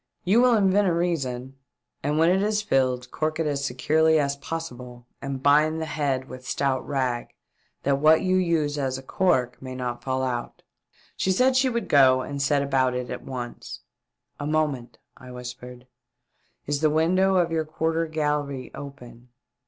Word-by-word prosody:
You 205 +6 +4
will 250 -1 +5
invent 200 -1 +3
a 175 - +2
reason, 135 -7 -2 0.4
and 145 +2 -1
when 165 +2 +4
it 190 +1 +2
is 210 +1 0
filled 130 -7 0
cork 155 0 -2
it 165 - +1
as 140 -2 -1
securely 155 +5 +2
as 140 -1 0
possible 125 -5 -7 0.2
and 135 -1 -5
bind 150 +2 +4
the 160 - -2
head 140 -4 -2
with 130 0 -10
stout 135 -2 0
rag 130 -4 -1 0.6
that 140 0 +1
what 155 +3 +5
you 185 0 +2
use 160 -5 0
as 130 -2 -1
a 130 - -10
cork 130 -7 0
may 130 -1 -7
not 125 -1 -4
fall 130 0 -1
out." 120 -2 -4 0.5
She 190 - 0
said 255 +7 +3
she 260 0 +3
would 235 -1 -2
go 130 -2 +5
and 140 +1 -5
see 140 +2 +2
about 135 -2 +1
it 125 0 -4
at - - -5
once. 125 -2 -7 0.3
" - - -52
A 145 - -3
moment," 150 -6 -1 0.2
I 130 - -13
whispered. 125 0 -9 0.8
Is 145 0 -2
the 155 - +4
window 185 +5 +2
of 175 -2 +2
your 160 -1 0
quarter 160 +1 -1
gallery 150 -4 -2
open 125 -3 -11
145 Hz, 175 wpm, -25 LUFS, 130-160 Hz, 0.8 s, will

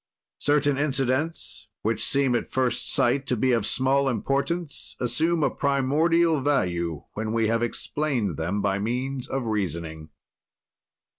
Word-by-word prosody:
"Certain 145 -1 +2
incidents, 135 -3 -1 0.2
which 110 +2 0
seem 135 -2 +2
at 120 - 0
first 130 -2 0
sight 135 +3 +2
to 125 - 0
be 130 +4 +2
of 115 -3 +1
small 135 +1 +2
importance, 135 - -2
assume 160 +7 +1
a - - +2
primordial 150 +4 +2
value 85 - 0
when 110 +1 -3
we 115 -1 +2
have 115 +1 +1
explained 120 - -2
them 90 +7 -2
by 100 -1 +1
means 125 +4 -2
of 135 -2 -3
reasoning. 85 -7 -3
130 Hz, 135 wpm, -25 LUFS, 105-140 Hz, 0.2 s, Certain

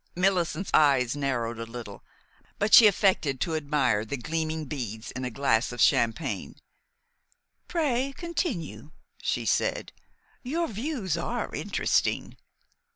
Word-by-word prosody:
Millicent's 180 -1 0
eyes 135 -4 +4
narrowed 120 -5 -2
a - - -3
little; 115 -4 -9 0.5
but 205 +1 0
she 225 - +11
affected 185 - +2
to 160 +3 -1
admire 140 -8 +1
the 125 +6 -4
gleaming 160 +2 -3
beads 115 -6 -5
in 130 - -6
a 125 - -2
glass 125 -2 +1
of 120 - -8
champagne. 115 +7 +1 1.1
"Pray 275 -6 0
continue," 315 - -3 0.3
she - - -1
said. - - 0 0.5
"Your 325 +7 -1
views 220 - -3
are 235 +8 -3
interesting." - - 0
155 Hz, 120 wpm, -27 LUFS, 125-205 Hz, 1.1 s, she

